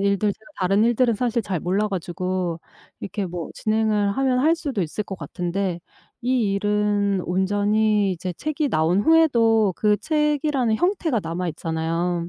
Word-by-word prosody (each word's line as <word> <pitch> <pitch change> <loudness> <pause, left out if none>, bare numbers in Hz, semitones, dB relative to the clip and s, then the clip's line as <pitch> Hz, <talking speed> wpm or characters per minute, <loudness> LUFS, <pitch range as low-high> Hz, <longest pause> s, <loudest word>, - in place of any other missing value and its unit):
일들 200 +1 +1
제가 220 +8 -18
다른 195 +3 +2
일들은 240 0 +2
사실 235 0 0
잘 185 -5 -3
몰라 195 +4 0
가지고 180 -1 -3 0.4
이렇게 200 -1 -4
뭐 175 -2 -6
진행을 215 -2 +1
하면 260 -2 +2
할 320 +5 +3
수도 270 - -3
있을 180 +5 -3
것 195 - -7
같은데 180 -1 -3 0.4
이 240 -5 +1
일은 205 -1 +1
온전히 205 +2 +1
이제 180 +1 -4
책이 300 - -2
나온 160 +4 +2
후에도 230 - +4
그 210 -1 +2
책이라는 300 -6 +1
형태가 340 - 0
남아 170 +2 -3
있잖아요. 165 +2 -2
205 Hz, 315 characters per minute, -23 LUFS, 180-235 Hz, 0.4 s, 후에도